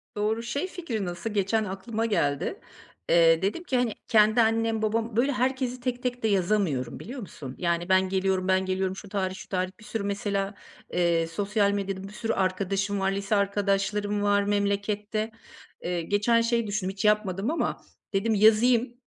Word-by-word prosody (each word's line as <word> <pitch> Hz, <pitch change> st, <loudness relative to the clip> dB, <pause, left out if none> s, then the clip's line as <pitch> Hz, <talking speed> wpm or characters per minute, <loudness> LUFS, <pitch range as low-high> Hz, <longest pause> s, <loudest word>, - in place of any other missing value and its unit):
Doğru, 215 Hz, +2 st, 0 dB
şey 280 Hz, +9 st, -2 dB
fikri 275 Hz, -, -4 dB
nasıl? 175 Hz, +4 st, -4 dB
Geçen 210 Hz, +1 st, +1 dB
aklıma 215 Hz, +3 st, -3 dB
geldi. 145 Hz, -10 st, 0 dB, 0.5 s
Eee, 165 Hz, -1 st, +5 dB
dedim 205 Hz, -, -1 dB
ki, 265 Hz, -7 st, 0 dB
hani, 245 Hz, -4 st, +1 dB
kendi 215 Hz, +1 st, +5 dB
annem, 225 Hz, 0 st, +1 dB
babam 225 Hz, +1 st, -1 dB
Böyle 265 Hz, +5 st, +3 dB
herkesi 255 Hz, 0 st, -1 dB
tek 250 Hz, 0 st, -3 dB
tek 245 Hz, -1 st, -2 dB
de -, -, +3 dB
yazamıyorum 185 Hz, -, 0 dB
biliyor 255 Hz, +4 st, -7 dB
musun? 135 Hz, -8 st, -8 dB
Yani, 170 Hz, 0 st, -1 dB
ben 190 Hz, 0 st, +4 dB
geliyorum, 190 Hz, -1 st, 0 dB
ben 190 Hz, 0 st, +2 dB
geliyorum, 190 Hz, 0 st, -1 dB
şu 200 Hz, 0 st, -10 dB
tarih, 190 Hz, -2 st, -2 dB
şu -, -, -10 dB
tarih 185 Hz, -1 st, -1 dB
bir 220 Hz, -, -15 dB
sürü 225 Hz, -3 st, -3 dB
mesela, 200 Hz, 0 st, -1 dB, 0.4 s
eee, 170 Hz, -2 st, +2 dB
sosyal 200 Hz, +4 st, +1 dB
medyada 195 Hz, -1 st, -3 dB
bir 195 Hz, +1 st, -9 dB
sürü 225 Hz, +1 st, -2 dB
arkadaşım 195 Hz, +1 st, 0 dB
var, 195 Hz, 0 st, +1 dB
lise 200 Hz, +2 st, -1 dB
arkadaşlarım 205 Hz, +1 st, 0 dB
var 205 Hz, 0 st, +3 dB
memlekette. 205 Hz, +2 st, -1 dB, 0.5 s
Eee, 175 Hz, 0 st, -2 dB
geçen 205 Hz, +7 st, +2 dB
şey 230 Hz, -1 st, +1 dB
düşündüm 200 Hz, -2 st, -2 dB
hiç 195 Hz, +1 st, -4 dB
yapmadım 210 Hz, +2 st, +2 dB
ama 330 Hz, -, -1 dB, 0.3 s
dedim 220 Hz, +3 st, +1 dB
yazayım 230 Hz, +3 st, +4 dB
205 Hz, 170 wpm, -27 LUFS, 190-225 Hz, 0.5 s, Eee